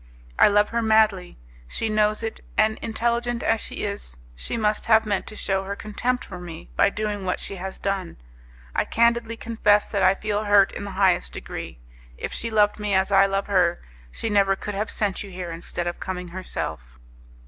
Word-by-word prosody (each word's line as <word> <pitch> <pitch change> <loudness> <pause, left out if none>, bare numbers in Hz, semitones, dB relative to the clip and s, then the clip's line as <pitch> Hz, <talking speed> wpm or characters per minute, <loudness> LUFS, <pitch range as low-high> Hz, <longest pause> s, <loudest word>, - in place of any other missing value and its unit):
I - - +8
love 205 0 +3
her 235 0 0
madly; 215 -5 +2 0.3
she 225 - -2
knows 215 0 +1
it, 225 - -4 0.2
and, 220 0 +3
intelligent 235 +1 -1
as 225 -1 +2
she - - -6
is, 200 - -6 0.2
she 150 - -4
must 210 -1 0
have 220 -1 +5
meant 200 -2 -1
to 215 - -8
shew 195 -2 -1
her 195 +1 -4
contempt 240 +5 -2
for 180 -3 -8
me 170 -2 -9
by 200 - +4
doing 210 -1 -3
what 180 -1 -1
she 195 - -5
has 190 +1 -6
done. 195 -3 -3 0.6
I - - +2
candidly 235 0 +1
confess 210 -3 +2
that 200 - -1
I 190 +1 +5
feel 210 +1 -2
hurt 205 -1 +5
in - - -6
the - - -5
highest 185 -3 +2
degree. - - -7 0.4
If - - -5
she 230 - -2
loved 210 -1 +3
me 205 -2 0
as 190 +1 +2
I 195 0 +6
love 195 0 -1
her, 180 -4 +2 0.3
she - - -4
never 200 -2 +3
could 210 +2 -6
have 205 +2 -2
sent 205 -3 0
you 200 - -7
here 180 -2 -6
instead 170 +1 -4
of 175 - -3
coming 180 -1 -5
herself." 60 - -5
205 Hz, 200 wpm, -24 LUFS, 190-220 Hz, 0.6 s, I